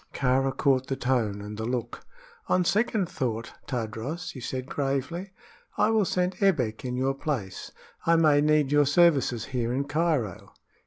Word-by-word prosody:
Kāra 135 +1 +1
caught 135 -2 +2
the 135 - -1
tone 115 -6 -1
and 105 0 -7
the 110 - -2
look. 120 -1 -3 0.4
"On 180 -1 +2
second 210 -1 +1
thought, 120 -10 -3 0.2
Tadros," 130 +8 -4
he 135 - -9
said, 130 +1 -4
gravely, 140 +7 -2 0.5
"I 220 - +3
will 220 -3 +3
send 180 +2 -1
Ebbek 135 - +1
in 125 -1 -3
your 135 +1 +1
place. 130 - -4 0.4
I 165 - +5
may 155 -3 +4
need 150 -2 +3
your 145 -1 +4
services 145 -6 +3
here 120 -2 0
in 135 +3 0
Cairo." 145 - -1
135 Hz, 160 wpm, -27 LUFS, 125-165 Hz, 0.5 s, I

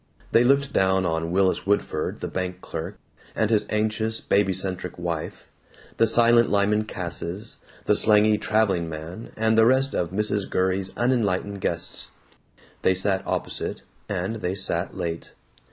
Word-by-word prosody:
They 115 - +5
looked 140 +2 +2
down 95 0 +2
on 80 -1 -1
Willis 95 +2 +1
Woodford 100 -6 -1
the - - -3
bank 90 -1 -4
clerk, 90 +2 -6 0.4
and 110 0 +1
his 105 -2 +2
anxious 110 +1 +1
babycentric 95 -2 0
wife, 85 -3 -5 0.5
the 115 - +4
silent 115 +1 +5
Lyman 105 +1 +2
Casses, 90 +2 -5 0.3
the - - +3
slangy 105 0 +5
traveling 100 -6 +1
man, 80 +7 -8
and 110 0 +2
the 110 0 +6
rest 135 +2 +3
of 85 - -1
Mrs. 105 0 -1
Gurrey's 95 +1 0
unenlightened 100 -5 0
guests. 85 0 -2 0.7
They 95 - +3
sat 95 +1 +2
opposite, - - -3 0.3
and 100 +3 -2
they 95 -3 -3
sat 90 -2 -2
late. 85 -2 -5
100 Hz, 140 wpm, -24 LUFS, 90-110 Hz, 0.7 s, the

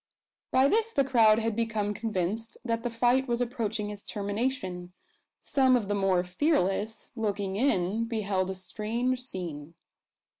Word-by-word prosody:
By 260 +1 +4
this 450 +7 +2
the 280 - +2
crowd 230 -5 +5
had 225 -1 -1
become 215 -2 -1
convinced 215 +1 -3
that 230 -1 0
the 240 - -2
fight 245 +3 +2
was 240 -1 0
approaching 225 -4 -2
its 205 -1 -9
termination. 200 -4 -3 0.5
Some 260 -2 +3
of 215 -5 -1
the - - +1
more 195 -3 +2
fearless, 210 - 0
looking 205 -4 -2
in, 215 -3 +1
beheld 200 -5 -1
a 190 - -3
strange 225 +7 -2
scene. 170 - -7
220 Hz, 145 wpm, -28 LUFS, 195-245 Hz, 0.5 s, crowd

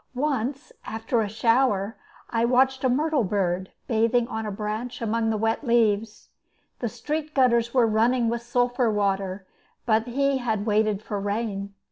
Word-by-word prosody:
Once, 275 0 -2
after 225 +1 -1
a 210 - -2
shower, 225 -2 +1 0.4
I 230 -1 +1
watched 260 +2 +3
a 260 - +3
myrtle 295 +1 +1
bird 190 -2 -1 0.2
bathing 230 +1 +2
on 220 -2 -3
a - - -3
branch 215 +4 -4
among 225 0 0
the 220 - 0
wet 225 +5 0
leaves. 225 -3 +1 0.5
The 240 - -2
street 300 +6 -4
gutters 235 -3 +3
were 250 -2 +4
running 230 +2 +2
with 235 0 -1
sulphur 245 0 +1
water, 195 -2 -1 0.4
but 225 0 +2
he 275 +2 +1
had 220 -4 -1
waited 215 -1 +1
for 205 -2 -3
rain. 200 -1 -3
230 Hz, 155 wpm, -25 LUFS, 210-250 Hz, 0.5 s, were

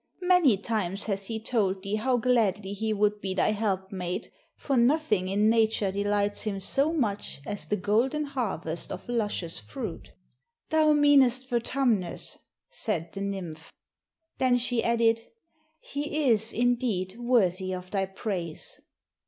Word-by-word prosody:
Many 355 - +5
times 200 -2 -2
has 195 -2 -2
he 225 -1 -3
told 200 -5 0
thee 195 - -4
how 250 +3 +1
gladly 215 -5 +1
he 220 +2 -2
would 210 0 +1
be 190 -1 -2
thy 190 - +3
helpmate, 190 -4 -2 0.3
for 275 - -1
nothing 235 - +2
in 205 +3 +2
nature 220 -3 +2
delights 205 +1 0
him 200 -2 -2
so 275 +10 +1
much 210 - -2
as 205 - -4
the 210 - +1
golden 230 +10 +1
harvest 205 - -3
of - - -7
luscious 205 -8 -2
fruit." 270 - -7 0.6
"Thou 310 -1 +4
meanest 270 -4 +4
Vertumnus," 235 -6 0 0.3
said 175 - -3
the 195 - -5
nymph. 180 -5 -5 0.7
Then 255 -1 +4
she 245 -1 0
added, 230 -1 +3 0.6
"He 295 +1 -2
is, 220 0 +2
indeed, 235 -5 0
worthy 190 -7 +2
of 185 0 -6
thy 195 -2 0
praise." 185 -4 -4
215 Hz, 135 wpm, -28 LUFS, 195-245 Hz, 0.7 s, Many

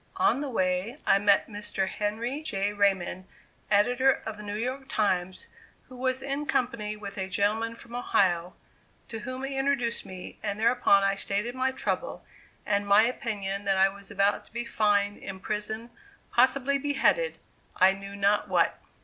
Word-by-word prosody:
On 380 -7 +3
the 290 - -3
way, 185 +2 -1
I 195 - +5
met 200 0 +4
Mr. 205 -2 -3
Henry 225 +8 -2
J. 205 -9 -1
Raymond, 190 -2 0 0.4
editor 245 +6 +3
of 220 - -4
the 210 - -10
New 205 0 -5
York 255 +5 -3
Times, 185 -3 0 0.4
who 255 - -11
was 255 +1 -1
in 280 +2 -3
company 235 -5 -1
with 200 -1 -8
a 190 0 -3
gentleman 215 +4 0
from 235 0 -11
Ohio, 180 -7 +1 0.5
to 225 - -5
whom 255 +4 -6
he 270 0 -2
introduced 270 -4 0
me, 185 -1 -9
and 200 +1 -3
thereupon 225 -4 +4
I 195 0 +3
stated 205 +4 -1
my 260 +1 0
trouble, 265 - -3 0.4
and 205 -1 0
my 200 +2 +6
opinion 205 -5 -2
that 195 -1 +2
I 190 +1 +5
was 200 0 -13
about 200 +1 +1
to - - -23
be 235 +1 -4
fined, 205 -2 +1
imprisoned, 210 +4 -5 0.4
possibly 275 +1 +3
beheaded, 290 - +1 0.4
I 190 +1 +6
knew 195 +1 -9
not 200 +1 +2
what. - - +1
210 Hz, 165 wpm, -28 LUFS, 200-250 Hz, 0.5 s, my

